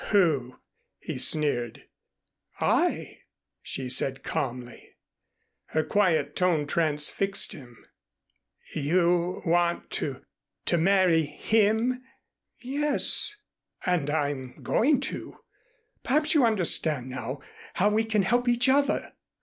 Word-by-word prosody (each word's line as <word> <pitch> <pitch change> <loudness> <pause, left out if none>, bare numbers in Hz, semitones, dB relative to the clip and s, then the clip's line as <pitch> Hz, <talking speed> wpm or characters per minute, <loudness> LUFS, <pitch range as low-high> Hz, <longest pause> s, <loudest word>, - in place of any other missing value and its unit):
"Who?" 150 - +1 0.4
he - - -6
sneered. 125 -7 +1 0.8
"I," - - 0 0.4
she 130 - -5
said 130 +1 -1
calmly. 125 -2 -5 0.7
Her 155 - -1
quiet 155 -5 +1
tone 175 -5 +1
transfixed 160 +5 +1
him. 125 -8 -14 0.9
"You 175 +4 +1
want 170 0 +1
to - - -4 0.4
to 175 - +2
marry 180 -3 +3
him?" 220 - +1 0.6
"Yes 290 +9 +1 0.5
and 175 -6 0
I'm 145 -4 -3
going 275 +2 +2
to. - - -5 0.7
Perhaps 300 +3 +2
you 280 -7 +4
understand 160 - +1
now 130 +1 -6 0.3
how 200 +3 +3
we 215 +1 +1
can 220 -2 +1
help 240 +5 +1
each 240 +1 +2
other." 280 +2 +1
175 Hz, 100 wpm, -26 LUFS, 145-220 Hz, 0.9 s, you